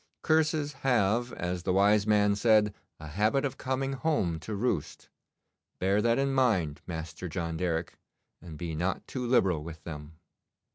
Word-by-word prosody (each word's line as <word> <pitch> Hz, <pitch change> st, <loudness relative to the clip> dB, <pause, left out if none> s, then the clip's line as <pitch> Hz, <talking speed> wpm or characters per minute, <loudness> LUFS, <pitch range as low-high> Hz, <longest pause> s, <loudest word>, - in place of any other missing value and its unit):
Curses 155 Hz, -2 st, +2 dB
have, 120 Hz, -1 st, +2 dB
as 90 Hz, 0 st, -3 dB
the 90 Hz, -, -1 dB
wise 100 Hz, +2 st, +4 dB
man 105 Hz, -1 st, +4 dB
said, 105 Hz, -1 st, +3 dB, 0.3 s
a 80 Hz, -, -9 dB
habit 105 Hz, -, +1 dB
of 135 Hz, -, -4 dB
coming 135 Hz, +1 st, -1 dB
home 130 Hz, -, 0 dB
to 105 Hz, +8 st, -5 dB
roost. 100 Hz, -, -2 dB, 0.7 s
Bear 100 Hz, +3 st, +2 dB
that 115 Hz, +1 st, +2 dB
in 135 Hz, 0 st, +1 dB
mind, 95 Hz, -, +1 dB
Master 85 Hz, +1 st, -6 dB
John 85 Hz, -1 st, -3 dB
Derrick, 85 Hz, -1 st, -2 dB, 0.4 s
and 80 Hz, -2 st, -9 dB
be 85 Hz, -1 st, -4 dB
not 90 Hz, +5 st, -2 dB
too 130 Hz, -, -5 dB
liberal 95 Hz, -10 st, +2 dB
with 80 Hz, -1 st, -9 dB
them. 75 Hz, -1 st, -8 dB
100 Hz, 155 wpm, -29 LUFS, 85-125 Hz, 0.7 s, wise